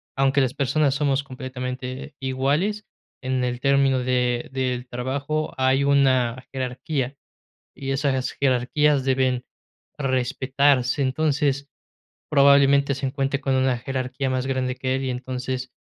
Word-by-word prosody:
aunque 135 +1 +2
las 130 -2 0
personas 140 0 +1
somos 140 -1 +1
completamente 130 0 -6
iguales, 145 +11 0 0.4
en 130 0 -1
el 125 0 -2
término 135 -1 +3
de 125 -1 0
del 125 -1 -2
trabajo 140 +5 -3
hay 130 +1 +2
una 130 -3 +2
jerarquía, 130 +1 -3 0.6
y 135 -1 -5
esas 135 -1 0
jerarquías 140 +2 +2
deben 130 -2 +1 0.5
respetarse. 130 +1 +1
Entonces, 140 0 0 0.6
probablemente 140 -1 +5
se 135 +1 -4
encuentre 135 +1 -1
con 135 -1 0
una 130 -1 +2
jerarquía 130 +2 -3
más 130 0 -1
grande 130 -1 -1
que 130 0 -1
él, 135 0 -2
y 130 - -1
entonces 130 0 -4
130 Hz, 125 wpm, -23 LUFS, 130-140 Hz, 0.6 s, probablemente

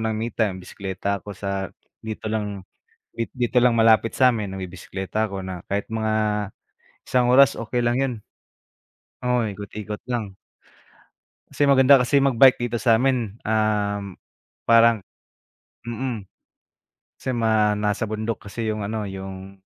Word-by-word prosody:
ng 110 -1 -1
me 115 +2 -3
time, 105 -5 0
bisekleta 100 +1 -4
ako 100 0 -9
sa 100 -1 -3 0.3
dito 110 -1 -7
lang, 105 -3 -3 0.5
di 115 - 0
dito 125 -1 -2
lang 125 0 +4
malapit 115 0 +4
sa'min, 115 -7 +2
nagbibisekleta 95 +2 -4
ako 95 0 -5
na 95 -2 -7
kahit 100 +1 -2
mga 110 -1 -1 1.0
isang 125 -1 +2
oras, 135 -1 +6
okey 115 +2 -3
lang 120 0 +1
'yon. 135 -2 0 1.1
Oo, 125 -2 +1
ikot-ikot 105 +1 -6
lang. 110 -6 -3 1.1
Kasi 145 - 0
maganda 140 0 +6
kasi 130 +3 +3
mag-bike 135 -2 +5
dito 120 - -2
sa'min, 115 -1 +1
um, 105 -2 0 0.7
parang 115 -1 +6 0.8
mm. 120 -1 -4 1.0
Kasi 130 - -3
mga 110 -3 +2
nasa 105 +2 0
bundok 110 +1 -3
kasi 110 +2 -4
yung 105 -1 -3
ano, 110 +1 -3
yung 95 0 -8
110 Hz, 130 wpm, -23 LUFS, 100-120 Hz, 1.1 s, oras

